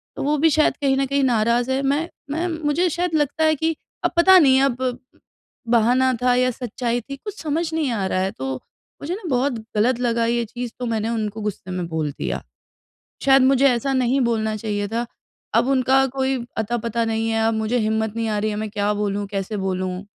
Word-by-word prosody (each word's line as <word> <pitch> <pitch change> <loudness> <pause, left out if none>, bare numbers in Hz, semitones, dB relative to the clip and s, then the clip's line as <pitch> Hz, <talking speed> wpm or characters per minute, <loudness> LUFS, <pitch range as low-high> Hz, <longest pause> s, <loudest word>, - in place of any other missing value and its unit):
तो - - -4
वो 295 +2 +1
भी 320 +3 +4
शायद 310 0 +2
कहीं 270 -1 +2
ना 275 - +2
कहीं 280 +1 0
नाराज़ 235 0 +2
है, 265 +1 +1
मैं 285 +5 0 0.2
मैं 330 +4 -1
मुझे 325 +1 0
शायद 350 +1 -2
लगता 295 +1 +1
है 315 0 +4
कि 320 +2 -1 0.3
अब - - +1
पता 375 +2 +7
नहीं 265 -4 +5
अब 255 -2 0 0.7
बहाना 245 +3 +3
था 250 0 +3
या 255 0 +3
सच्चाई 245 0 -3
थी 275 +5 -8
कुछ 410 +8 -8
समझ 320 +1 -2
नहीं 315 -4 0
आ 205 -4 -1
रहा 185 - 0
है 190 +1 -1
तो 130 0 -4 0.5
मुझे 320 +5 -3
ना 430 - -10
बहुत 265 +1 +1 0.2
गलत 240 +3 +2
लगा 235 -2 +1
ये 235 0 +1
चीज़ 240 +1 -6
तो 250 - -3
मैंने 225 -1 -1
उनको 220 -2 -3
गुस्से 205 -3 -5
में 180 -2 -3
बोल 160 -3 -2
दिया। - - -4 0.8
शायद 270 -1 +6
मुझे 270 +1 +4
ऐसा 250 +2 0
नहीं 260 +1 +2
बोलना 220 -2 0
चाहिए 205 -1 -3
था, 235 +3 -2 0.5
अब 260 - +3
उनका 265 0 +3
कोई 265 0 +1 0.2
अता-पता 230 +1 -1
नहीं 225 0 -1
है 225 0 +1
अब 225 - 0
मुझे 220 +3 0
हिम्मत 220 0 -1
नहीं 230 -1 -1
आ 210 -1 0
रही 215 +1 0
है, 210 - -3
मैं 215 0 -4
क्या 205 0 0
बोलूँ 205 0 -2
कैसे 195 +1 -3
बोलूँ? 185 0 -3
240 Hz, 210 wpm, -22 LUFS, 215-275 Hz, 0.8 s, पता